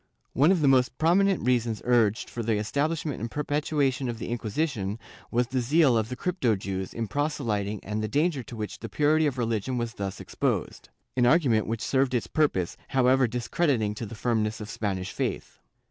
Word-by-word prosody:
One 145 Hz, +8 st, +4 dB
of 185 Hz, -4 st, +2 dB
the 145 Hz, -, +3 dB
most 130 Hz, -2 st, +3 dB
prominent 185 Hz, +2 st, +3 dB
reasons 120 Hz, -3 st, +1 dB
urged 115 Hz, -3 st, +2 dB
for 120 Hz, -, -5 dB
the 115 Hz, -1 st, 0 dB
establishment 145 Hz, +7 st, -1 dB
and 115 Hz, -, -3 dB
perpetuation 145 Hz, -1 st, 0 dB
of 115 Hz, -, -4 dB
the -, -, -6 dB
Inquisition 110 Hz, -3 st, -2 dB, 0.3 s
was 120 Hz, +1 st, +1 dB
the 130 Hz, +2 st, -2 dB
zeal 140 Hz, +1 st, +4 dB
of 110 Hz, 0 st, 0 dB
the 125 Hz, -, -4 dB
crypto 130 Hz, -, 0 dB
Jews 95 Hz, -1 st, -4 dB
in 115 Hz, -1 st, -3 dB
proselyting 110 Hz, -8 st, -1 dB
and 105 Hz, +1 st, -3 dB
the 110 Hz, -, -1 dB
danger 145 Hz, +5 st, +1 dB
to 120 Hz, -, -9 dB
which 110 Hz, -2 st, -5 dB
the 115 Hz, -, -7 dB
purity 155 Hz, +1 st, +3 dB
of 135 Hz, -3 st, -2 dB
religion 115 Hz, +1 st, -1 dB
was 120 Hz, -1 st, -2 dB
thus 100 Hz, -4 st, -5 dB
exposed -, -, -2 dB
— -, -, -49 dB
an 120 Hz, -1 st, +4 dB
argument 125 Hz, -7 st, +3 dB
which 115 Hz, 0 st, -3 dB
served 130 Hz, -1 st, +1 dB
its 120 Hz, -, 0 dB
purpose, 120 Hz, -, 0 dB
however 130 Hz, 0 st, +3 dB
discrediting 120 Hz, -1 st, 0 dB
to 110 Hz, +1 st, -6 dB
the 115 Hz, -, -8 dB
firmness 110 Hz, -2 st, 0 dB
of 105 Hz, 0 st, -7 dB
Spanish 95 Hz, -3 st, -3 dB
faith. -, -, -4 dB
120 Hz, 190 wpm, -27 LUFS, 110-145 Hz, 0.3 s, One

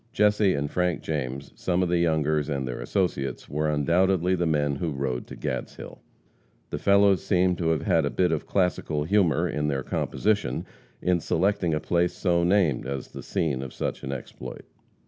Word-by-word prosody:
Jesse 105 Hz, -2 st, +3 dB
and 70 Hz, +1 st, -2 dB
Frank 90 Hz, -2 st, 0 dB
James, 70 Hz, -3 st, -3 dB
some 90 Hz, 0 st, 0 dB
of 90 Hz, -, -1 dB
the 85 Hz, 0 st, +2 dB
Youngers 80 Hz, -2 st, +1 dB
and 70 Hz, -3 st, -2 dB
their 60 Hz, -, -4 dB
associates, 85 Hz, -9 st, -2 dB
were 75 Hz, +2 st, -1 dB
undoubtedly 90 Hz, +4 st, +2 dB
the 90 Hz, -2 st, +1 dB
men 75 Hz, -3 st, +1 dB
who 85 Hz, +2 st, -2 dB
rode 65 Hz, -4 st, -3 dB
to -, -, -9 dB
Gadshill. -, -, -5 dB, 0.7 s
The -, -, -3 dB
fellows 100 Hz, -1 st, +4 dB
seemed 90 Hz, -2 st, +2 dB
to 85 Hz, -2 st, +1 dB
have 80 Hz, -2 st, +1 dB
had -, -, +3 dB
a -, -, 0 dB
bit 90 Hz, -2 st, +1 dB
of 80 Hz, -, -2 dB
classical 90 Hz, -5 st, 0 dB
humor 85 Hz, -4 st, +2 dB
in 75 Hz, 0 st, -1 dB
their 70 Hz, -2 st, -1 dB
composition 105 Hz, -, -1 dB, 0.4 s
in 90 Hz, -1 st, +2 dB
selecting 85 Hz, -1 st, +1 dB
a -, -, 0 dB
place 85 Hz, +3 st, +1 dB
so 85 Hz, -3 st, +1 dB
named 85 Hz, -8 st, +2 dB
as 70 Hz, 0 st, -4 dB
the -, -, -8 dB
scene 70 Hz, -6 st, -1 dB
of 65 Hz, -2 st, -7 dB
such -, -, -3 dB
an 65 Hz, -, -5 dB
exploit. 70 Hz, -3 st, -8 dB
80 Hz, 185 wpm, -26 LUFS, 75-90 Hz, 0.7 s, fellows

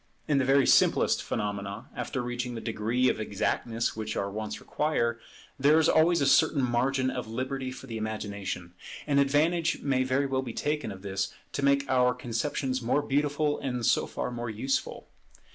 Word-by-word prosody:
In 145 Hz, -3 st, +3 dB
the 130 Hz, -, +1 dB
very 135 Hz, 0 st, +4 dB
simplest -, -, +4 dB
phenomena, 100 Hz, 0 st, -4 dB
after 135 Hz, -4 st, -3 dB
reaching 120 Hz, 0 st, -3 dB
the -, -, -4 dB
degree 115 Hz, +3 st, 0 dB
of -, -, +1 dB
exactness 115 Hz, +2 st, -1 dB
which 110 Hz, 0 st, -4 dB
our 100 Hz, 0 st, -2 dB
wants 110 Hz, +1 st, -5 dB
require, 120 Hz, -6 st, -1 dB, 0.4 s
there 145 Hz, +3 st, +5 dB
is 160 Hz, -, +4 dB
always 165 Hz, +1 st, +4 dB
a -, -, +3 dB
certain 140 Hz, 0 st, +4 dB
margin 130 Hz, +2 st, +1 dB
of 125 Hz, -3 st, -4 dB
liberty 130 Hz, +3 st, -3 dB
for 130 Hz, +1 st, -9 dB
the 115 Hz, -4 st, -5 dB
imagination; 100 Hz, -5 st, -4 dB, 0.3 s
and 140 Hz, -1 st, +2 dB
advantage 155 Hz, +4 st, +2 dB
may 135 Hz, -2 st, +1 dB
very 130 Hz, +2 st, +1 dB
well 135 Hz, -1 st, 0 dB
be 120 Hz, -3 st, -6 dB
taken 150 Hz, -4 st, -2 dB
of 95 Hz, 0 st, -10 dB
this 95 Hz, -1 st, -2 dB, 0.2 s
to 140 Hz, -, -3 dB
make 140 Hz, 0 st, +3 dB
our 125 Hz, -1 st, +3 dB
conceptions 130 Hz, +2 st, -2 dB
more 125 Hz, +5 st, +1 dB
beautiful 145 Hz, +1 st, 0 dB
and 125 Hz, -3 st, -2 dB
so -, -, +3 dB
far -, -, -4 dB
more 120 Hz, -1 st, -4 dB
useful. 120 Hz, +6 st, -2 dB
130 Hz, 180 wpm, -28 LUFS, 115-140 Hz, 0.4 s, there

